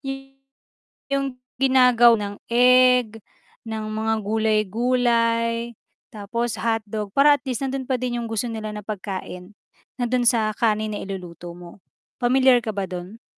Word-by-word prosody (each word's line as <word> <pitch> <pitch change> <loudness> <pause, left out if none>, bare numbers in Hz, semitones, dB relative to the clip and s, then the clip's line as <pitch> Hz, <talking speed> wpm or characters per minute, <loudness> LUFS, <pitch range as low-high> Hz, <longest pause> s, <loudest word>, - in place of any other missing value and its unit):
Y 270 0 -7 0.8
'yong 275 -1 -1 0.2
ginagawa 250 -3 +5
ng 205 0 -5
egg, 250 -2 +4 0.5
ng 220 -1 -4
mga 220 +1 -1
gulay-gulay, 230 +2 +1 0.4
tapos 220 +1 -3
hotdog 215 -2 -2
para 290 +1 +6
at 285 - -1
least 255 0 -2
nando'n 265 -1 -4
pa 260 - +1
din 245 -1 -3
'yong 230 - -6
gusto 225 +2 -2
nila 220 -2 -5
na 210 -1 -8
pagkain. 195 -1 -7 0.4
Nando'n 245 0 0
sa 220 -3 +2
kanin 215 -1 0
na 205 - -5
iluluto 175 -3 -8
mo, 175 +2 -13 0.4
pamilyar 255 0 +4
ka 220 - -5
ba 195 -1 -1
do'n? 185 +5 -8
230 Hz, 140 wpm, -23 LUFS, 210-250 Hz, 0.8 s, para